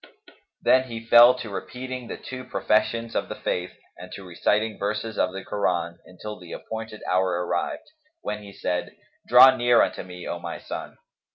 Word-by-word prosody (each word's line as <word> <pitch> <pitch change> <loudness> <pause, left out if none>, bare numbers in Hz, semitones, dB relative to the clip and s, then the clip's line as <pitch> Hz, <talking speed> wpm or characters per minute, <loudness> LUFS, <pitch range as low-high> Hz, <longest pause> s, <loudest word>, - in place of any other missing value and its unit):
Then 130 0 +5
he 115 -1 -7
fell 120 +2 +8
to 115 -4 -7
repeating 125 +4 -6
the - - -6
two 130 0 -8
professions 115 0 0
of - - -1
the - - -4
Faith 90 0 -3 0.3
and 90 0 -10
to 100 - -8
reciting 105 +5 0
verses 105 +2 -2
of 90 - +1
the 95 +1 -7
Koran, 85 -4 -1
until 105 +4 -8
the 90 -2 -10
appointed 110 -1 -7
hour 90 -1 +1
arrived, 85 0 -2 0.4
when 105 0 -4
he 100 -1 -11
said, 90 -2 -3 0.3
"Draw 130 +2 +9
near 120 -1 +5
unto - - -2
me, 90 -1 -9
O - - -4
my - - -6
son." - - -7
105 Hz, 175 wpm, -25 LUFS, 90-120 Hz, 0.4 s, Draw